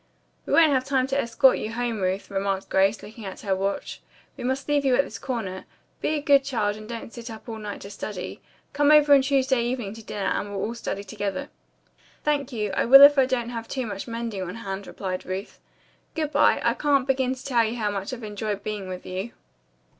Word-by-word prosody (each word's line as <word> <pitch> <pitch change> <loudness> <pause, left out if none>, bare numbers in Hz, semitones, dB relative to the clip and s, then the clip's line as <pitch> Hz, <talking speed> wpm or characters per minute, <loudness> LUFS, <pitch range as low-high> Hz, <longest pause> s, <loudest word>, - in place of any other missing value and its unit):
"We - - -1
won't 320 -2 +6
have 260 -1 +2
time 265 -1 +1
to 275 +1 +1
escort 250 +3 +4
you 220 - -4
home, 235 -3 -2
Ruth," 190 +2 -2
remarked 195 0 -2
Grace, 195 +3 +2
looking 220 +1 -10
at 190 -2 -7
her 195 -2 0
watch. 195 +1 -3 0.3
"We - - -8
must 265 +2 -2
leave 290 -1 +2
you 265 -2 +3
at 280 - +4
this - - -9
corner. 215 -8 -4 0.4
Be 310 - 0
a 295 - -1
good 280 -1 +5
child 220 -7 -1
and 215 +1 -11
don't 230 -1 -7
sit 235 0 -8
up 220 +1 -10
all 225 -1 -6
night 210 -1 -6
to 200 - -9
study. 195 -2 -6 0.3
Come 290 0 +3
over 295 -2 +7
Tuesday 265 -2 +2
evening 240 -4 -3
to 225 0 -11
dinner, 205 -2 -4
and 205 - -2
we'll 200 -1 -4
all 225 - -2
study 200 -4 -4
together." 200 -1 -4 0.7
"Thank 285 -2 0
you, 210 -4 -2
I 190 - +1
will 275 +4 +9
if 285 0 +8
I 260 - +4
don't 245 -2 -1
have 230 -2 -5
too 260 -2 -3
much 200 -1 -5
mending 230 -4 -4
on 185 +2 -5
hand," 200 -3 -6
replied 185 -2 -4
Ruth. 190 +2 -6 0.6
"Good 310 -2 -1
bye. - - +4
I - - +4
can't 280 -3 +2
begin 265 -1 +1
to 260 - -13
tell 245 -4 +3
you 225 +1 -2
how 210 -3 0
much 200 -1 -4
I've 250 -2 -7
enjoyed 210 -1 -4
being 210 -3 -4
with 185 0 -7
you." 190 +5 -5
230 Hz, 225 wpm, -25 LUFS, 200-265 Hz, 0.7 s, will